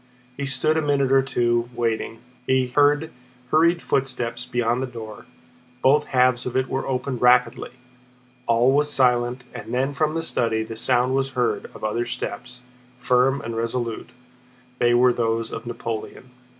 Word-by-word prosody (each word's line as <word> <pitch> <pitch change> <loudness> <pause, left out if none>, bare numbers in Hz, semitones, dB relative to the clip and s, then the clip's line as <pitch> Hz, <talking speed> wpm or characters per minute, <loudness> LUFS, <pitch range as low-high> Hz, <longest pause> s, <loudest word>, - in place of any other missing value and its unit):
He 140 +1 -4
stood 145 +4 +2
a - - +2
minute 140 -3 +1
or 135 0 +5
two, 120 -2 0
waiting. 115 -1 -2 0.3
He 130 0 +3
heard 145 +3 +2 0.4
hurried 170 +2 +3
footsteps 125 -3 -1
beyond 120 0 0
the 130 - -2
door, 110 -4 -10 0.6
both 145 +3 +4
halves 125 -1 +2
of 125 - -2
it 130 0 +1
were 135 - -3
opened 125 -1 -3
rapidly; 125 0 +3 0.8
all 120 +2 +4
was 145 +2 +2
silent 125 -1 +2
and - - -8
then 135 +3 0
from 155 +2 0
the 165 - -2
study 115 -7 -1
the 110 0 -8
sound 125 +2 +1
was 135 0 0
heard 125 -1 0
of - - -12
other 115 +3 -1
steps, 125 +1 -6 0.4
firm 125 +2 +2
and 115 0 -5
resolute—they 125 +1 -4
were 125 0 +5
those 115 -1 -1
of 115 +1 -7
Napoleon. 115 +1 -6
125 Hz, 155 wpm, -23 LUFS, 120-135 Hz, 0.8 s, or